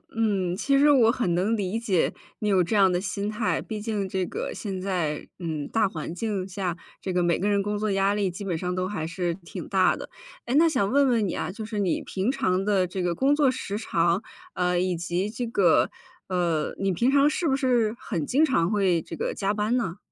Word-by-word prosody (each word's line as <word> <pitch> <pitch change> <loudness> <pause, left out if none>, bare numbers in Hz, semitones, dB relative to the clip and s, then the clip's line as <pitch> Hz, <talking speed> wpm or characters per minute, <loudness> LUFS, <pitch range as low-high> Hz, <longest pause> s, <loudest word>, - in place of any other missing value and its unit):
嗯。 195 -6 +1
其 275 +6 +2
实 295 +1 +6
我 240 -6 +6
很 210 -9 0
能 205 +6 +1
理 200 +2 -2
解 200 -7 +1 0.3
你 210 - -2
有 190 -3 +4
这 215 +6 -1
样 195 -2 +6
的 175 - +1
心 200 +1 -3
态， 215 +1 -1
毕 215 -2 -6
竟 210 -3 -2
这 190 -1 -1
个 - - -4
现 195 -3 -4
在， 175 -6 -2
嗯， 155 -4 -3
大 220 -2 +2
环 165 -2 -6
境 200 -2 -2
下 185 -2 -3 0.2
这 190 - -3
个 180 0 +1
每 175 -1 +2
个 205 +2 0
人 200 -1 +2
工 205 +1 -2
作 215 -1 -1
压 195 +1 +2
力 200 -3 0
基 200 +4 -7
本 175 -4 -1
上 180 +1 -2
都 185 0 -1
还 185 -6 -3
是 175 0 -2
挺 175 -3 -9
大 - - +3
的。 - - -8 0.4
诶， 245 - -1
那 330 +2 +6
想 235 -9 +1
问 280 +1 +4
问 225 -5 +2
你 - - -3
啊， - - -3
就 215 +2 -7
是 215 -2 -4
你 190 -4 0
平 195 +6 -1
常 185 -5 0
的 195 -3 +2
这 185 +1 -4
个 175 -1 +1
工 275 +8 +2
作 280 -4 +3
时 210 -5 -4
长， 170 -3 +1 0.3
呃， 180 0 +1
以 180 -1 0
及 175 +4 -2
这 240 +2 -4
个， 190 -7 +3 0.4
呃， 170 -4 0
你 195 -1 +1
平 240 +9 +2
常 285 +1 +5
是 330 +2 -1
不 265 - +3
是 245 -5 +2
很 165 -8 -3
经 300 +5 +3
常 175 - +1
会 190 -5 +2
这 165 - -8
个 - - -2
加 200 0 0
班 210 +3 0
呢？ 190 -7 -1
195 Hz, 250 characters per minute, -26 LUFS, 180-225 Hz, 0.4 s, 实